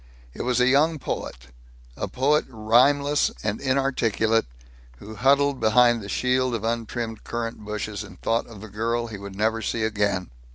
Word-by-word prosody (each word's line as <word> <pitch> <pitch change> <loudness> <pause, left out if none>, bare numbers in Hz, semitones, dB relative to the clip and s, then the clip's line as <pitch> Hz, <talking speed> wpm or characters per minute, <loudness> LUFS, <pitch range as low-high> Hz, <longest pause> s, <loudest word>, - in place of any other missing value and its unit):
It - - -6
was 125 -1 0
a 125 - +4
young 150 +5 +3
poet, - - -6 0.5
a - - -3
poet 145 +4 +1
rhymeless 135 +6 +3
and 105 0 -2
inarticulate, 115 - +1 0.5
who 105 - -10
huddled 140 +3 +2
behind 120 +1 +4
the 100 - -8
shield 130 0 +1
of 110 - -4
untrimmed 115 0 -3
currant 115 -1 -4
bushes, 105 -1 -4
and 95 -3 -13
thought 115 +1 0
of 110 -4 -12
the 110 - -8
girl 115 +3 -2
he 110 -3 -8
would 100 -1 -9
never 110 +2 0
see 110 +1 -2
again. 100 - -1
115 Hz, 165 wpm, -24 LUFS, 105-130 Hz, 0.5 s, a